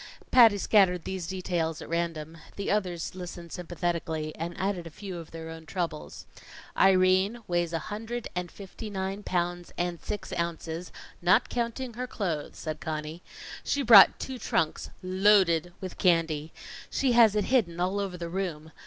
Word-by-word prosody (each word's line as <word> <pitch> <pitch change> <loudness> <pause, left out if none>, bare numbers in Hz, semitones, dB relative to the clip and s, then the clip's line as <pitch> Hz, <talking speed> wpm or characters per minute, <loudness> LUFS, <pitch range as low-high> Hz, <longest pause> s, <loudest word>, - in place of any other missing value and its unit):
Patty 230 -5 +7
scattered 185 -4 +3
these 185 -3 -4
details 175 -4 -2
at - - -8
random. 165 -1 -3 0.2
The 200 - -2
others 180 -5 -1
listened 175 -2 -8
sympathetically, 170 -3 -3
and 170 +1 -5
added 185 -2 -2
a - - -7
few 185 +2 -7
of 165 - -10
their 165 0 -8
own 160 -1 -10
troubles. 170 -4 -4 0.5
"Irene 190 +4 +4
weighs 175 -1 0
a 165 - 0 0.2
hundred 225 +3 -4
and 180 -1 -3
fifty 205 +2 -9
nine 195 0 -3
pounds 175 -2 -2
and 175 -1 -2
six 210 -1 -5
ounces, 170 0 -3 0.3
not 190 +7 +4
counting 240 +1 -3
her 250 +2 -4
clothes," 170 -11 -3
said 155 -2 -5
Conny. 155 +2 -4 0.4
"She 285 - 0
brought 220 -5 +9
two 260 -2 -5
trunks 165 -7 -1
loaded 185 -3 +3
with 185 -1 -7
candy. 165 -4 +2 0.4
She 265 -2 +1
has 230 -3 +6
it 210 - +2
hidden 175 -10 +2
all 185 +3 0
over 195 -3 -3
the 170 -1 -5
room. 165 -4 -4
180 Hz, 160 wpm, -28 LUFS, 165-200 Hz, 0.5 s, brought